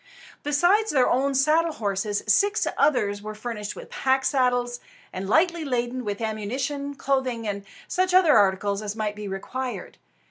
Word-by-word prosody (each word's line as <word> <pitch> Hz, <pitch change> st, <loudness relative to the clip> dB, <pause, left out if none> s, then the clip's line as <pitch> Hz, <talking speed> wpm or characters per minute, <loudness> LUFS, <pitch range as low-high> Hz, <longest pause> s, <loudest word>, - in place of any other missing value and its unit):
Besides 350 Hz, +9 st, +2 dB
their 260 Hz, -7 st, +3 dB
own 270 Hz, +2 st, +1 dB
saddle 310 Hz, +4 st, +3 dB
horses, 205 Hz, -2 st, -2 dB
six 405 Hz, -, +3 dB
others 225 Hz, -8 st, +1 dB
were 215 Hz, +1 st, -7 dB
furnished 210 Hz, -2 st, -5 dB
with -, -, -11 dB
pack 265 Hz, 0 st, +1 dB
saddles, 245 Hz, -3 st, +1 dB, 0.3 s
and 190 Hz, +1 st, -5 dB
lightly 335 Hz, +5 st, +3 dB
laden 250 Hz, -2 st, -2 dB
with 205 Hz, 0 st, -4 dB
ammunition, 265 Hz, +7 st, -3 dB
clothing, 260 Hz, -4 st, -1 dB
and 200 Hz, -1 st, -3 dB, 0.2 s
such 370 Hz, 0 st, 0 dB
other 360 Hz, -5 st, +5 dB
articles 200 Hz, +1 st, +2 dB
as 210 Hz, 0 st, -4 dB
might 215 Hz, -2 st, -2 dB
be 210 Hz, -1 st, -6 dB
required. 245 Hz, +7 st, -5 dB
245 Hz, 150 wpm, -25 LUFS, 210-285 Hz, 0.3 s, other